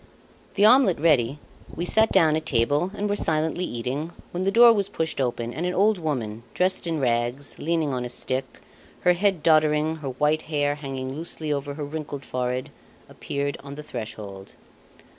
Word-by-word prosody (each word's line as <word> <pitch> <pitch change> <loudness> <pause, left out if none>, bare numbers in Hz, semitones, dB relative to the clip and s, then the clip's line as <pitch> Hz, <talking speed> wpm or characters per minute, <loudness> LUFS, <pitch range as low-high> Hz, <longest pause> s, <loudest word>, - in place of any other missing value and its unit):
The 205 - +4
omelette 235 - +5
ready, 145 -4 +3 0.4
we 170 - -2
sat 220 +4 +3
down 155 -2 +4
at 155 0 -3
table 145 +7 +2
and 205 - -2
were 205 - 0
silently 160 0 0
eating, 135 +7 -4 0.2
when 180 +2 -2
the 195 - +2
door 235 +2 +8
was 200 -3 0
pushed 160 -3 -2
open 120 -2 -2
and 165 - -4
an 180 0 -1
old 205 0 +3
woman, 120 -9 -3
dressed 185 -1 +1
in 165 -2 -1
rags, 120 +2 -1
leaning 160 -3 0
on 125 -1 -2
a 125 - -4
stick, 130 +2 -3 0.4
her 180 - +5
head 185 -3 +1
doddering, 155 0 +3
her 145 -3 -5
white 150 +4 +1
hair 145 -2 +1
hanging 135 -2 -5
loosely 155 -1 -3
over 140 0 -4
her 150 -1 -4
wrinkled 145 -2 -6
forehead, 125 0 -3 0.4
appeared 140 0 -3
on 140 0 -8
the 150 - -8
threshold. 105 -7 -8
150 Hz, 180 wpm, -25 LUFS, 130-170 Hz, 0.4 s, door